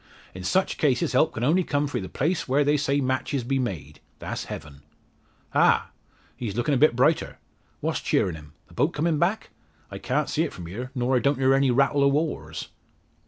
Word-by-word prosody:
In 95 Hz, -, -8 dB
such 190 Hz, -, 0 dB
cases 135 Hz, -5 st, +1 dB
help 145 Hz, +5 st, +3 dB
can 110 Hz, -, -3 dB
only 170 Hz, +8 st, +3 dB
come 145 Hz, -3 st, 0 dB
frae 145 Hz, -, -3 dB
the 95 Hz, -, -7 dB
place 165 Hz, +6 st, -1 dB
where 140 Hz, +3 st, +3 dB
they 145 Hz, +1 st, +2 dB
say 140 Hz, -1 st, +1 dB
matches 130 Hz, 0 st, -1 dB
be 135 Hz, +3 st, 0 dB
made 80 Hz, -, -4 dB, 0.2 s
that's -, -, -5 dB
Heaven. 70 Hz, -2 st, -9 dB, 0.7 s
Ha! -, -, +3 dB, 0.4 s
he's 115 Hz, -5 st, -5 dB
lookin' 130 Hz, +5 st, +1 dB
a -, -, +3 dB
bit 145 Hz, -3 st, +4 dB
brighter! 150 Hz, +6 st, +1 dB, 0.4 s
What's -, -, -1 dB
cheerin' 90 Hz, -, +1 dB
him? 75 Hz, -1 st, -12 dB
The -, -, -19 dB
boat 145 Hz, -, +1 dB
coming 155 Hz, 0 st, +1 dB
back? 195 Hz, +6 st, 0 dB, 0.4 s
I -, -, -6 dB
can't -, -, -1 dB
see -, -, -1 dB
it -, -, -1 dB
from 90 Hz, -, -8 dB
here, 115 Hz, +9 st, -6 dB
nor 125 Hz, +1 st, +1 dB
I -, -, +4 dB
don't 140 Hz, +2 st, +1 dB
hear 135 Hz, 0 st, +3 dB
any 135 Hz, 0 st, +3 dB
rattle 140 Hz, +3 st, +3 dB
o' 140 Hz, -, +5 dB
oars!" 140 Hz, -, -2 dB
135 Hz, 205 wpm, -25 LUFS, 115-145 Hz, 0.7 s, o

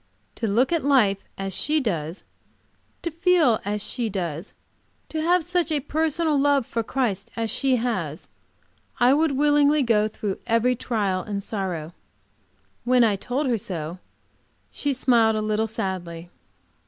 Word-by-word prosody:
To 225 Hz, -, -3 dB
look 235 Hz, +8 st, +2 dB
at 335 Hz, -2 st, +1 dB
life 240 Hz, -9 st, +3 dB, 0.2 s
as 195 Hz, 0 st, -4 dB
she 305 Hz, -, +2 dB
does, 170 Hz, -, -3 dB, 0.8 s
to 340 Hz, -, -2 dB
feel 335 Hz, -, +3 dB
as 205 Hz, +1 st, -3 dB
she 240 Hz, -3 st, -2 dB
does, 175 Hz, -2 st, -4 dB, 0.5 s
to 315 Hz, -, -3 dB
have 350 Hz, +2 st, +3 dB
such 350 Hz, 0 st, -1 dB
a 300 Hz, -, +2 dB
personal 310 Hz, +1 st, 0 dB
love 280 Hz, -3 st, +2 dB
to 230 Hz, -, +1 dB
Christ 220 Hz, -5 st, -2 dB
as 225 Hz, -1 st, -2 dB
she 270 Hz, -2 st, +1 dB
has, 190 Hz, -, -3 dB, 0.7 s
I 245 Hz, +2 st, +5 dB
would 310 Hz, 0 st, +2 dB
willingly 290 Hz, +1 st, +3 dB
go 215 Hz, -3 st, +3 dB
through 205 Hz, -2 st, -4 dB
every 230 Hz, +2 st, +2 dB
trial 205 Hz, -6 st, -1 dB
and 200 Hz, +1 st, -4 dB
sorrow. 180 Hz, -7 st, -4 dB, 0.9 s
When 250 Hz, 0 st, +4 dB
I 215 Hz, -3 st, +3 dB
told 250 Hz, +8 st, -2 dB
her 240 Hz, -4 st, +1 dB
so, 170 Hz, -2 st, -5 dB, 0.7 s
she 285 Hz, -, -1 dB
smiled, 235 Hz, -4 st, +3 dB
a -, -, 0 dB
little 215 Hz, +1 st, 0 dB
sadly. 175 Hz, -5 st, -5 dB
230 Hz, 150 wpm, -24 LUFS, 195-285 Hz, 0.9 s, I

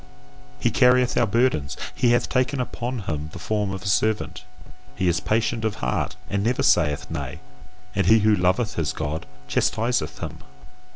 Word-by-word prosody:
He 120 Hz, -, +1 dB
carrieth 125 Hz, +1 st, +4 dB
our 120 Hz, -, +3 dB
burdens, 110 Hz, -, +1 dB, 0.2 s
he 120 Hz, -, +2 dB
hath 120 Hz, 0 st, +3 dB
taken 130 Hz, +1 st, 0 dB
upon 125 Hz, -1 st, -3 dB
him 80 Hz, -5 st, -4 dB
the -, -, -7 dB
form 105 Hz, +3 st, -1 dB
of 95 Hz, 0 st, -5 dB
a -, -, -5 dB
servant, 105 Hz, +1 st, 0 dB, 0.5 s
he 95 Hz, -, 0 dB
is 85 Hz, 0 st, +2 dB
patient 115 Hz, +1 st, 0 dB
of 110 Hz, -1 st, 0 dB
heart 60 Hz, +2 st, -2 dB
and 100 Hz, 0 st, -1 dB
never 120 Hz, +3 st, +1 dB
saith 75 Hz, -5 st, +2 dB
Nay; 70 Hz, +2 st, -4 dB, 0.5 s
and 100 Hz, -2 st, +1 dB
he 110 Hz, -, +7 dB
who 110 Hz, 0 st, +4 dB
loveth 95 Hz, +4 st, +1 dB
his 80 Hz, -2 st, 0 dB
God 75 Hz, +1 st, -4 dB, 0.2 s
chastiseth 120 Hz, +2 st, 0 dB
him. -, -, -6 dB
105 Hz, 170 wpm, -24 LUFS, 90-120 Hz, 0.5 s, he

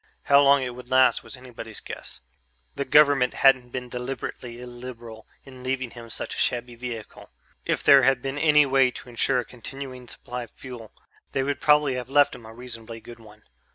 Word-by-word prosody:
How 140 Hz, +1 st, +6 dB
long 140 Hz, -1 st, +5 dB
it 125 Hz, -, -3 dB
would 125 Hz, 0 st, -12 dB
last 130 Hz, 0 st, +4 dB
was -, -, -10 dB
anybody's 115 Hz, -4 st, -9 dB
guess. -, -, -8 dB, 0.5 s
The 140 Hz, -, -3 dB
government 145 Hz, -4 st, +4 dB
hadn't 130 Hz, -2 st, +4 dB
been 125 Hz, 0 st, -5 dB
deliberately 125 Hz, -1 st, -6 dB
illiberal 120 Hz, -2 st, -10 dB, 0.2 s
in 130 Hz, -2 st, -13 dB
leaving 130 Hz, -1 st, -2 dB
him 115 Hz, -1 st, -11 dB
such -, -, -5 dB
a -, -, -5 dB
shabby 120 Hz, 0 st, 0 dB
vehicle; 120 Hz, -2 st, -8 dB, 0.4 s
if -, -, -1 dB
there 140 Hz, -1 st, +8 dB
had 130 Hz, 0 st, +3 dB
been 135 Hz, +2 st, -4 dB
any 150 Hz, -1 st, +5 dB
way 135 Hz, -1 st, +4 dB
to 125 Hz, -, -11 dB
ensure 120 Hz, +1 st, +1 dB
a -, -, -11 dB
continuing 130 Hz, 0 st, -9 dB
supply 125 Hz, +1 st, -7 dB
of 120 Hz, -, -9 dB
fuel, 120 Hz, -3 st, -11 dB, 0.4 s
they 135 Hz, -, +1 dB
would 140 Hz, +1 st, -2 dB
probably 150 Hz, -2 st, +4 dB
have 125 Hz, 0 st, -5 dB
left 145 Hz, +1 st, +4 dB
him 120 Hz, -3 st, -11 dB
a -, -, -10 dB
reasonably 115 Hz, -1 st, -8 dB
good 120 Hz, +1 st, -12 dB
one. 105 Hz, -1 st, -17 dB
125 Hz, 190 wpm, -25 LUFS, 120-135 Hz, 0.5 s, there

